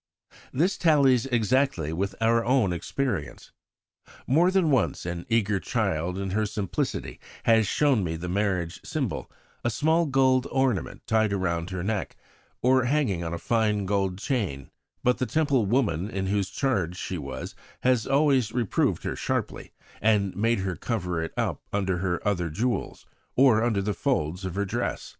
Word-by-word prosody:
This 175 +9 +1
tallies 135 -7 +4
exactly 120 - +1
with 95 +3 -2
our 115 +1 +3
own 120 -6 +2
experience. 115 - -3 0.7
More 165 +7 +4
than 185 -5 +2
once 130 - +1
an 85 -1 -5
eager 105 -3 +2
child 95 -6 -1
in 95 -1 -3
her 105 +2 +1
simplicity 100 -3 -3 0.2
has 110 -2 +4
shown 135 -6 +2
me 80 -2 -2
the 85 +2 -5
marriage 90 -3 -1
symbol, - - -3 0.3
a 120 - +1
small 160 +8 +2
gold 130 -1 +3
ornament 130 -7 -1
tied 110 -2 +2
round 85 -3 -1
her 95 -2 -4
neck, 105 0 -2 0.5
or 130 0 +4
hanging 125 - +1
on 85 - -3
a 85 - -2
fine 105 -1 +1
gold 95 -2 0
chain; 95 - -2 0.3
but 125 0 +2
the 130 - 0
Temple 140 -8 +1
woman 100 -6 +1
in 95 -3 -3
whose 100 -1 0
charge 95 -11 -1
she 90 -1 -4
was 65 -2 -6 0.3
has 125 -3 +2
always 135 -5 +3
reproved 120 -5 0
her - - -2
sharply, - - -3 0.3
and 100 -3 +2
made 115 +1 +1
her 95 -2 -2
cover 90 -8 -2
it 80 - -4
up - - -1
under 95 -3 0
her 90 +1 -2
other 90 -4 0
jewels, 115 +10 -2 0.3
or 125 -4 +5
under 110 -5 +1
the 105 +1 -1
folds 85 +1 -1
of 95 -1 -4
her 100 +1 0
dress. 95 - -3
105 Hz, 160 wpm, -26 LUFS, 95-125 Hz, 0.7 s, or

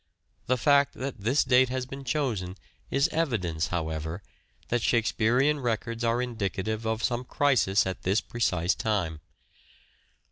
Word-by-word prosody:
The 130 - +2
fact 140 +1 +3
that 130 -3 -5
this 120 +8 +2
date 130 0 +4
has 130 0 -2
been 135 +1 -8
chosen 115 -9 -2 0.3
is 140 +3 +2
evidence, 105 - -1
however, 80 +1 -3 0.5
that 120 0 +1
Shakespearean 120 +6 +2
records 115 -1 -2
are 120 +2 +1
indicative 110 -1 -3
of 110 0 -1
some 120 0 0
crisis 125 -7 +2
at 95 0 -4
this 95 +4 +2
precise 90 -7 0
time. 90 -8 -2
115 Hz, 135 wpm, -27 LUFS, 95-130 Hz, 0.5 s, date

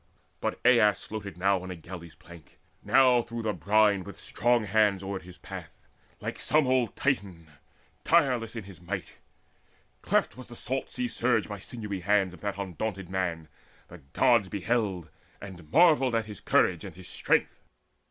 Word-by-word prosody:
But - - -2
Aias 110 -6 +5
floated 100 -5 -7
now 95 0 +2
on 95 - -8
a 90 - -5
galley's 85 -1 -10
plank, 85 -2 -16 0.2
Now 125 -2 +5
through 115 0 -6
the 110 -1 0
brine 100 +3 +3
with 100 - -9
strong 120 -1 +1
hands 105 -2 +2
oared 95 0 -4
his 90 0 -13
path, - - -8 0.5
Like - - -5
some 155 -1 +3
old 125 -3 +1
Titan 130 -8 0
in 85 -2 -16
his 75 -3 -29
tireless 115 - +1
might. 90 0 -6 0.8
Cleft - - +1
was 130 +1 -10
the 120 - -11
salt 130 +3 -3
sea 250 - -2
surge 120 - +1
by 105 - -6
the - - -14
sinewy 105 -3 -5
hands 95 0 +2
Of - - -14
that 100 -2 -3
undaunted 95 0 -4
man: 90 -4 -2 0.4
the - - -11
Gods 120 -7 +4
beheld 100 -4 -1 0.3
And 90 -5 -11
marvelled 150 -8 +5
at 115 -1 0
his 105 -3 -9
courage 85 -3 +2
and 95 -5 -9
his 90 0 -10
strength. - - 0
100 Hz, 170 wpm, -28 LUFS, 90-115 Hz, 0.8 s, Aias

